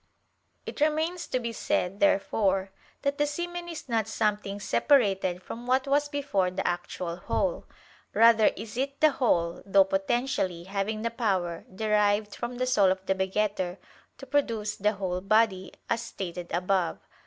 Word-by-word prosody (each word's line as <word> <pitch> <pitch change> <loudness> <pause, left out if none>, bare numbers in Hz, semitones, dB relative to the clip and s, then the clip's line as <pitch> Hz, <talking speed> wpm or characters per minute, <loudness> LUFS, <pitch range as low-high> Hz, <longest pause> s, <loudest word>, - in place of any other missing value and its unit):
It - - -7
remains 315 +4 +1
to 255 - -1
be 235 -1 -4
said, 195 -2 -1
therefore, 195 -1 +2 0.3
that 280 +1 -1
the 295 - +3
semen 345 +3 -4
is 330 -4 -7
not 225 -3 0
something 210 -2 -1
separated 195 -6 +2
from 240 +2 -8
what 260 +2 +2
was 290 +1 +2
before 275 -11 0
the 185 +1 -3
actual 175 0 -3
whole; - - -2 0.4
rather 225 -1 +6
is 220 +2 -8
it 275 +2 -2
the 310 -1 +5
whole, 170 -11 +1
though 195 0 +5
potentially, 195 -2 -1
having 200 +3 -3
the 230 - -1
power, 190 -8 -1
derived 210 0 +1
from 240 +1 -5
the 255 - 0
soul 205 -7 +4
of 190 0 -2
the 190 - +2
begetter, 190 -1 -1 0.4
to 270 - -10
produce 230 -7 0
the 210 +2 +1
whole 185 -3 -3
body, 195 -2 +2 0.2
as 230 - 0
stated 180 -6 -6
above 180 -1 +1
(A. - - -32
210 Hz, 160 wpm, -28 LUFS, 190-255 Hz, 0.4 s, rather